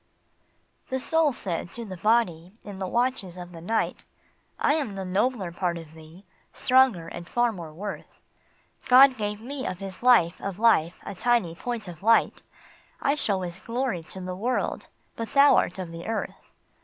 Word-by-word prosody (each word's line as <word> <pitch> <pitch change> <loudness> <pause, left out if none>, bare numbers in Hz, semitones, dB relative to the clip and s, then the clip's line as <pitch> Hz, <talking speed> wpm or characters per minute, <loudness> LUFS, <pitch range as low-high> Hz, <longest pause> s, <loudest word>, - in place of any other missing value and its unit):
JHE 260 -1 -1
Soul 320 +2 +2
said 175 -7 -3
to 235 0 -6
the 190 -3 -7
Body, 185 -4 +1
in 200 -2 -9
the 190 - -2
watches 235 -5 -1
of 175 0 -8
the 165 -1 -10
night: 225 +7 -1 0.3
" - - -41
I - - +5
am 280 -10 -2
the 190 -1 -4
nobler 195 0 0
part 175 0 -2
of 160 -2 -11
thee, 160 +4 -15 0.3
stronger 255 -10 +3
and 170 0 -8
far 240 +3 +1
more 170 -6 -8
worth. 195 +6 -8 0.7
God 260 +1 +8
gave 210 -1 -3
me 260 +2 -5
of 185 - -4
his 195 0 -8
life 235 -9 +4
of 195 -2 -4
life 205 -7 +3
a 200 - -5
tiny 215 -3 +1
point 230 +3 -5
of 175 -1 -9
light; 230 +3 +3 0.6
I 280 - +2
show 205 -10 0
his 175 0 -6
glory 235 -6 -2
to 190 - -9
the 180 0 -5
world, 240 +7 -2 0.3
but 230 -1 -6
thou 280 +1 +7
art 180 - +1
of 180 -3 -6
the 165 +2 -8
earth." 225 -1 -4
200 Hz, 180 wpm, -26 LUFS, 175-240 Hz, 0.7 s, God